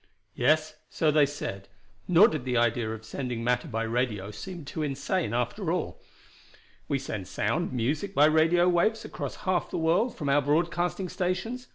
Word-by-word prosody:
"Yes, 155 Hz, 0 st, +1 dB
so 155 Hz, -2 st, +1 dB
they 150 Hz, -1 st, +4 dB
said, 100 Hz, -9 st, -6 dB, 0.4 s
nor 180 Hz, +5 st, +7 dB
did 155 Hz, -, -3 dB
the 125 Hz, -1 st, 0 dB
idea 120 Hz, -1 st, +1 dB
of 110 Hz, 0 st, -6 dB
sending 120 Hz, 0 st, -4 dB
matter 125 Hz, +6 st, 0 dB
by 115 Hz, -4 st, -2 dB
radio 115 Hz, -4 st, -1 dB
seem 175 Hz, -, -8 dB
too 155 Hz, -, -5 dB
insane, 145 Hz, -, -1 dB
after 125 Hz, -, -1 dB
all. 180 Hz, -2 st, -3 dB, 0.9 s
We 140 Hz, -, +1 dB
send 110 Hz, -8 st, -5 dB
sound, 175 Hz, -, -1 dB
music 145 Hz, -, -2 dB
by 145 Hz, -, +6 dB
radio 160 Hz, +3 st, +4 dB
waves 180 Hz, +6 st, +2 dB
across -, -, -5 dB
half 185 Hz, -2 st, +1 dB
the -, -, -3 dB
world 175 Hz, +9 st, +1 dB
from 145 Hz, -, -4 dB
our 140 Hz, +1 st, +4 dB
broadcasting 175 Hz, +5 st, 0 dB
stations. 190 Hz, +8 st, -3 dB
150 Hz, 170 wpm, -28 LUFS, 125-175 Hz, 0.9 s, nor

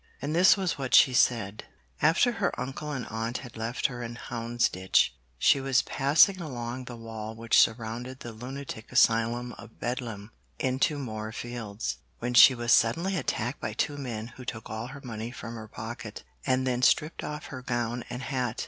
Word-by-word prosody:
And 145 Hz, +3 st, -2 dB
this 185 Hz, +4 st, +7 dB
was 185 Hz, -6 st, -1 dB
what 130 Hz, -2 st, +2 dB
she 130 Hz, -, +7 dB
said: 110 Hz, -4 st, +2 dB, 0.4 s
After 165 Hz, -, +4 dB
her 225 Hz, -5 st, -1 dB
uncle 135 Hz, +4 st, -4 dB
and 130 Hz, -5 st, -3 dB
aunt 115 Hz, +2 st, -2 dB
had 125 Hz, -, -11 dB
left 115 Hz, +2 st, -3 dB
her 125 Hz, -2 st, 0 dB
in 120 Hz, 0 st, -5 dB
Houndsditch, 115 Hz, -6 st, +1 dB, 0.3 s
she 140 Hz, -, +4 dB
was 135 Hz, -1 st, +2 dB
passing 155 Hz, +7 st, +4 dB
along 125 Hz, -4 st, -5 dB
the 125 Hz, -, -7 dB
wall 110 Hz, -1 st, -7 dB
which 115 Hz, 0 st, +3 dB
surrounded 115 Hz, +3 st, -1 dB
the 120 Hz, -, -6 dB
lunatic 125 Hz, 0 st, -7 dB
asylum 115 Hz, +2 st, +3 dB
of 115 Hz, -1 st, -13 dB
Bedlam, 115 Hz, -4 st, -4 dB, 0.3 s
into 130 Hz, +3 st, +1 dB
Moorfields, 110 Hz, -, -5 dB, 0.2 s
when 120 Hz, +1 st, -3 dB
she 125 Hz, +2 st, +9 dB
was 120 Hz, 0 st, +2 dB
suddenly 170 Hz, +12 st, +3 dB
attacked 125 Hz, -6 st, -2 dB
by 110 Hz, -, -3 dB
two 145 Hz, +6 st, -1 dB
men 120 Hz, -5 st, -5 dB
who 125 Hz, +2 st, -11 dB
took 115 Hz, -2 st, -6 dB
all 110 Hz, +2 st, -4 dB
her 140 Hz, +2 st, -9 dB
money 115 Hz, -2 st, -5 dB
from 115 Hz, -2 st, -8 dB
her 110 Hz, -1 st, -8 dB
pocket, 110 Hz, +1 st, -7 dB, 0.2 s
and 130 Hz, 0 st, +2 dB
then 125 Hz, -1 st, 0 dB
stripped 150 Hz, +5 st, +2 dB
off 150 Hz, 0 st, -5 dB
her 130 Hz, -, -6 dB
gown 120 Hz, -1 st, -2 dB
and 125 Hz, +2 st, -5 dB
hat. 125 Hz, -3 st, -2 dB
120 Hz, 175 wpm, -28 LUFS, 115-135 Hz, 0.4 s, she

